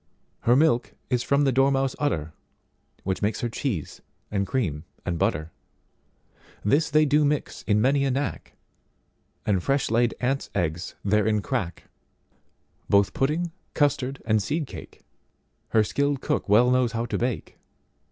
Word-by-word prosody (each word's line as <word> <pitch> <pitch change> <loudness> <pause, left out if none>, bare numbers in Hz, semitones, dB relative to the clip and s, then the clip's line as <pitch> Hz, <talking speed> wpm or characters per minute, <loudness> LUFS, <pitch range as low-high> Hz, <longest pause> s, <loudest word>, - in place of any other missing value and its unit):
Her 120 - +3
milk 135 -4 +2 0.2
is 125 -1 +2
from 140 +3 +2
the 135 - +3
dormouse 135 0 +2
udder, 80 - -1 0.7
Which 95 0 -2
makes 105 +4 0
her 120 - -1
cheese 110 - -4 0.3
and 100 -2 0
cream 80 - -1 0.2
and 85 -2 -2
butter:This 105 - -4
they 155 +1 +4
do 150 +1 +3
mix 145 0 -1
in 105 -1 +3
many 135 +5 +3
a - - +1
knack, 140 +3 -3 0.9
And 100 -4 +2
fresh 135 +3 0
laid 120 0 +2
ants' 135 +2 -1
eggs 85 +1 -2
therein 105 0 +2
crack:—Both 100 - -3
pudding, 160 +5 0 0.2
custard 135 -2 0
and 110 -1 +2
seed 150 +9 -1
cake, - - -11 0.7
Her 110 - +4
skilled 140 +5 0
cook - - -2
well 120 +5 +5
knows 125 -3 +2
how 115 0 -1
to 120 - -2
bake. 120 -2 -3
125 Hz, 140 wpm, -25 LUFS, 105-140 Hz, 0.9 s, well